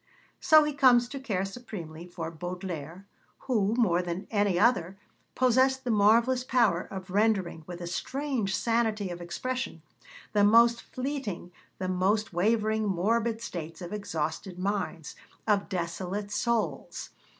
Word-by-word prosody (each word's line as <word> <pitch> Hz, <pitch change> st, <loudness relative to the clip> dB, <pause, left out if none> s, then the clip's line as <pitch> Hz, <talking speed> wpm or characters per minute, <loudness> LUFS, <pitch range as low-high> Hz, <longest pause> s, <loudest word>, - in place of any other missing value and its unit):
So 310 Hz, -1 st, +6 dB
he 300 Hz, 0 st, -1 dB
comes 250 Hz, -3 st, +5 dB
to 275 Hz, -, -6 dB
care 200 Hz, -8 st, -1 dB
supremely 180 Hz, -7 st, -8 dB
for 165 Hz, -2 st, -6 dB
Baudelaire, 175 Hz, 0 st, -6 dB, 0.4 s
'who, 220 Hz, -4 st, +1 dB
more 185 Hz, -8 st, +3 dB
than 175 Hz, +2 st, -4 dB
any 205 Hz, -4 st, +2 dB
other, 195 Hz, -3 st, +2 dB, 0.4 s
possessed 260 Hz, +1 st, +3 dB
the 245 Hz, -, -1 dB
marvellous 230 Hz, +5 st, +4 dB
power 240 Hz, -9 st, +2 dB
of 190 Hz, -1 st, -7 dB
rendering, 200 Hz, -5 st, +1 dB
with 175 Hz, -1 st, -7 dB
a -, -, -4 dB
strange 250 Hz, +1 st, -2 dB
sanity 220 Hz, -4 st, 0 dB
of 175 Hz, 0 st, -7 dB
expression, 250 Hz, 0 st, -4 dB, 0.5 s
the 205 Hz, -1 st, +4 dB
most 230 Hz, +3 st, +6 dB
fleeting, 255 Hz, -10 st, -5 dB, 0.3 s
the 185 Hz, -, -3 dB
most 190 Hz, +3 st, +1 dB
wavering 215 Hz, +3 st, +1 dB
morbid 225 Hz, +5 st, 0 dB
states 165 Hz, -6 st, -6 dB
of 175 Hz, +1 st, -7 dB
exhausted 175 Hz, -2 st, -3 dB
minds, 185 Hz, -5 st, -3 dB, 0.3 s
of 205 Hz, -2 st, +2 dB
desolate 185 Hz, +3 st, -3 dB
souls.' 235 Hz, 0 st, -2 dB
205 Hz, 135 wpm, -28 LUFS, 180-235 Hz, 0.5 s, So